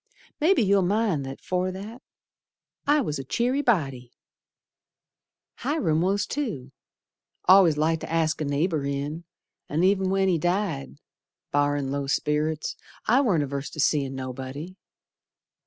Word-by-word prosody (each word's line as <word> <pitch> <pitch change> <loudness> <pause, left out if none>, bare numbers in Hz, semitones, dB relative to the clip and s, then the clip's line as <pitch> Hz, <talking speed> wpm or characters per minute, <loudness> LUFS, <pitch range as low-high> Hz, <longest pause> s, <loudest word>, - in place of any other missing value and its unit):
Mebbe 335 +5 +4
you'll 200 -5 +4
mind 185 -7 +1
that 135 - -8
afore 185 0 -1
that 215 +6 -8 0.9
I 295 +1 +4
was 150 - -3
a - - -4
cheery 245 - 0
body. 135 - 0 1.5
Hiram 165 - 0
was 195 +3 +1
too, 200 - -4 0.8
Al'ays 185 -5 +7
liked 160 +1 +1
to - - -6
ask 160 -1 +1
a - - 0
neighbor 150 +2 0
in, 140 +4 -3 0.4
An' 155 +4 0
ev'n 190 0 +3
when 195 0 +2
he 175 -3 +2
died, 175 - -1 0.6
Barrin' 145 -1 +1
low 140 0 -2
sperrits, 150 +2 0 0.3
I 250 +5 +4
warn't 190 - +2
averse 140 0 -4
to 155 - -10
seein' 140 -3 +1
nobody. 130 +6 -6
160 Hz, 135 wpm, -26 LUFS, 140-195 Hz, 1.5 s, Al'ays